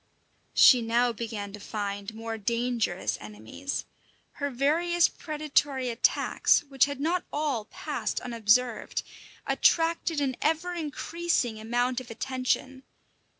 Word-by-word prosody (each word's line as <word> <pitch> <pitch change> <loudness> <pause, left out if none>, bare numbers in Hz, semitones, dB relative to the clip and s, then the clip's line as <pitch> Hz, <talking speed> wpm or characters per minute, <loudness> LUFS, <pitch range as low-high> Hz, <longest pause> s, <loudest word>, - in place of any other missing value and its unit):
She 250 -3 +8
now 235 +2 +2
began 210 -3 -5
to 210 - -8
find 200 0 -4
more 225 0 -4
dangerous 225 - -1
enemies. 110 - -6 0.5
Her 285 0 -3
various 330 +7 +2
predatory 295 -4 -1
attacks, 230 0 +2
which 275 -2 +3
had 285 -1 -5
not 340 +5 0
all 285 -7 -1
passed - - -3
unobserved, 235 0 +1 0.4
attracted 330 -1 +2
an 270 -3 -1
ever 325 +3 +1
increasing 315 -6 -1
amount 245 +3 0
of 250 - -13
attention. 260 +2 -2
250 Hz, 110 wpm, -28 LUFS, 225-295 Hz, 0.5 s, She